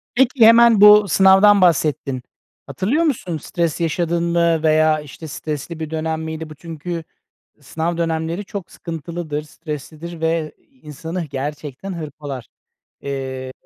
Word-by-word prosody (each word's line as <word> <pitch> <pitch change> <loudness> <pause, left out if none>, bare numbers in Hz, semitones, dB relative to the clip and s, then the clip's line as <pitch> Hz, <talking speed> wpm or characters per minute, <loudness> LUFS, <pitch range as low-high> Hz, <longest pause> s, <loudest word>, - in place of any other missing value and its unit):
Peki, 250 -2 +4
hemen 230 -2 +7
bu 210 0 +8
sınavdan 195 +2 +6
bahsettin. 150 -6 +1 0.5
Hatırlıyor 200 - 0
musun? 220 - -1
Stres 170 +2 -2
yaşadın 170 +1 0
mı 170 -1 +1
veya, 155 0 +3
işte, 150 +2 -10
stresli 155 +2 -5
bir 160 -1 -4
dönem 160 0 -2
miydi? 160 0 -6
Bu 155 - -10
çünkü 165 +2 -6 0.5
s - - -32
sınav 160 +5 -3
dönemleri 165 +3 -2
çok 195 -2 -7
sıkıntılıdır, 165 -2 -5
streslidir 155 +2 -8
ve 160 -1 -1
i 270 -2 -33
insanı 160 +4 -6
gerçekten 145 +5 -6
hırpalar. 145 -5 -7 0.5
Eee, 130 -2 -5
160 Hz, 130 wpm, -20 LUFS, 150-175 Hz, 0.5 s, bu